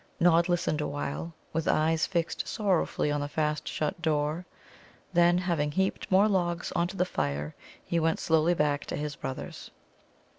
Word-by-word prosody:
Nod 170 Hz, 0 st, +4 dB
listened 170 Hz, -3 st, +1 dB
awhile, 145 Hz, +3 st, -4 dB, 0.2 s
with 165 Hz, 0 st, -1 dB
eyes 160 Hz, +1 st, +2 dB
fixed 170 Hz, -3 st, -1 dB
sorrowfully 190 Hz, -7 st, 0 dB
on 145 Hz, 0 st, 0 dB
the 145 Hz, -, -2 dB
fast 150 Hz, +1 st, -1 dB
shut 155 Hz, +4 st, -2 dB
door; 155 Hz, +2 st, 0 dB, 0.7 s
then, 175 Hz, 0 st, +5 dB
having 170 Hz, -5 st, 0 dB
heaped 190 Hz, +3 st, -1 dB
more 195 Hz, +3 st, +5 dB
logs 175 Hz, -3 st, 0 dB
on 170 Hz, 0 st, +1 dB
to 190 Hz, +2 st, -8 dB
the 180 Hz, -, +2 dB
fire, 75 Hz, -, -2 dB, 0.3 s
he 170 Hz, -, 0 dB
went 165 Hz, 0 st, +1 dB
slowly 160 Hz, +2 st, +3 dB
back 145 Hz, -2 st, +1 dB
to -, -, -3 dB
his 150 Hz, 0 st, -3 dB
brothers. 130 Hz, -2 st, -6 dB
165 Hz, 160 wpm, -29 LUFS, 150-175 Hz, 0.7 s, then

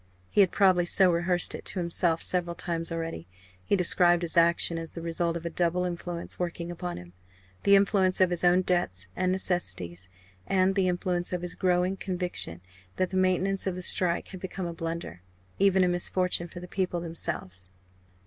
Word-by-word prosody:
He 205 Hz, -, +5 dB
had 190 Hz, -, +5 dB
probably 185 Hz, -3 st, +3 dB
so 185 Hz, 0 st, +4 dB
rehearsed 175 Hz, +1 st, 0 dB
it -, -, -7 dB
to 190 Hz, -, -3 dB
himself 170 Hz, -1 st, 0 dB
several 175 Hz, -2 st, -1 dB
times 165 Hz, -1 st, -1 dB
already. 165 Hz, -, -4 dB, 0.4 s
He 200 Hz, -, +1 dB
described 175 Hz, -1 st, +4 dB
his 170 Hz, -, -1 dB
action 170 Hz, 0 st, +4 dB
as 165 Hz, -1 st, -6 dB
the 165 Hz, -, -7 dB
result 170 Hz, 0 st, -1 dB
of 170 Hz, -, -9 dB
a -, -, -1 dB
double 175 Hz, +2 st, 0 dB
influence 175 Hz, -1 st, -5 dB
working 175 Hz, -1 st, -3 dB
upon 175 Hz, +1 st, -5 dB
him 90 Hz, 0 st, -12 dB, 0.5 s
the 200 Hz, -, +5 dB
influence 195 Hz, -2 st, +3 dB
of 185 Hz, -1 st, +4 dB
his 175 Hz, -, -1 dB
own 180 Hz, +1 st, +4 dB
debts 175 Hz, -, 0 dB
and 185 Hz, 0 st, 0 dB
necessities, 95 Hz, -, -2 dB, 0.4 s
and 190 Hz, 0 st, +2 dB
the 190 Hz, -1 st, +1 dB
influence 175 Hz, 0 st, -1 dB
of 180 Hz, -1 st, -3 dB
his 175 Hz, -, -2 dB
growing 180 Hz, +1 st, +1 dB
conviction 180 Hz, -, -3 dB, 0.3 s
that 185 Hz, 0 st, -1 dB
the -, -, -4 dB
maintenance 185 Hz, +1 st, +1 dB
of 185 Hz, -, -1 dB
the 185 Hz, -, -6 dB
strike 175 Hz, -1 st, +1 dB
had 190 Hz, -, -8 dB
become 190 Hz, 0 st, -5 dB
a 170 Hz, -, -4 dB
blunder, 165 Hz, -, -5 dB, 0.4 s
even 195 Hz, -1 st, +4 dB
a -, -, +3 dB
misfortune 175 Hz, 0 st, 0 dB
for 175 Hz, -, -10 dB
the 180 Hz, -, -9 dB
people 185 Hz, -2 st, -2 dB
themselves. 95 Hz, -, -4 dB
175 Hz, 185 wpm, -27 LUFS, 170-185 Hz, 0.5 s, He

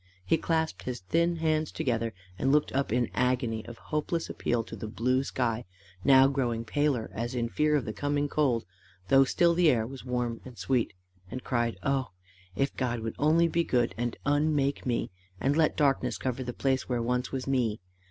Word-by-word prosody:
He -, -, +3 dB
clasped 160 Hz, -, -1 dB
his 125 Hz, +2 st, -5 dB
thin 170 Hz, -, +1 dB
hands 155 Hz, -1 st, 0 dB
together, 115 Hz, -2 st, -1 dB, 0.3 s
and 135 Hz, -, +2 dB
looked 150 Hz, +1 st, +3 dB
up 140 Hz, -3 st, 0 dB
in 125 Hz, +2 st, +2 dB
an -, -, -14 dB
agony 125 Hz, -3 st, 0 dB
of 120 Hz, 0 st, -9 dB
hopeless 160 Hz, +2 st, -2 dB
appeal 120 Hz, -1 st, -1 dB
to -, -, -9 dB
the 110 Hz, -, -6 dB
blue 125 Hz, +4 st, +1 dB
sky, 120 Hz, -3 st, -1 dB, 0.4 s
now 135 Hz, -1 st, +7 dB
grown 120 Hz, -4 st, -1 dB
paler 145 Hz, -2 st, 0 dB
as 120 Hz, +3 st, -3 dB
in 120 Hz, -1 st, -1 dB
fear 150 Hz, +4 st, +2 dB
of 140 Hz, -6 st, 0 dB
the 110 Hz, -, -4 dB
coming 145 Hz, +2 st, 0 dB
cold, 135 Hz, -6 st, +1 dB, 0.4 s
though 135 Hz, 0 st, +6 dB
still 170 Hz, +5 st, +3 dB
the 170 Hz, -1 st, +4 dB
air 115 Hz, -5 st, +2 dB
was 130 Hz, +2 st, -8 dB
warm 125 Hz, -2 st, -2 dB
and 125 Hz, -3 st, -11 dB
sweet, 125 Hz, -5 st, 0 dB, 0.4 s
and 130 Hz, +1 st, -6 dB
cried, 120 Hz, -2 st, 0 dB
"Oh! 135 Hz, -2 st, 0 dB, 0.5 s
if 135 Hz, +6 st, 0 dB
God 120 Hz, -3 st, -1 dB
would 110 Hz, 0 st, -4 dB
only 160 Hz, +3 st, +4 dB
be 170 Hz, +1 st, +1 dB
good 120 Hz, -6 st, +1 dB
and 120 Hz, 0 st, -2 dB
unmake 145 Hz, -1 st, +1 dB
me, 120 Hz, -5 st, -1 dB, 0.3 s
and 140 Hz, +2 st, +1 dB
let 160 Hz, -1 st, +2 dB
darkness 140 Hz, -2 st, +2 dB
cover 130 Hz, 0 st, -2 dB
the 125 Hz, -, -4 dB
place 130 Hz, +1 st, -1 dB
where 125 Hz, -1 st, 0 dB
once 125 Hz, +1 st, -1 dB
was 130 Hz, -1 st, -3 dB
me! 120 Hz, -6 st, 0 dB
130 Hz, 195 wpm, -29 LUFS, 120-145 Hz, 0.5 s, now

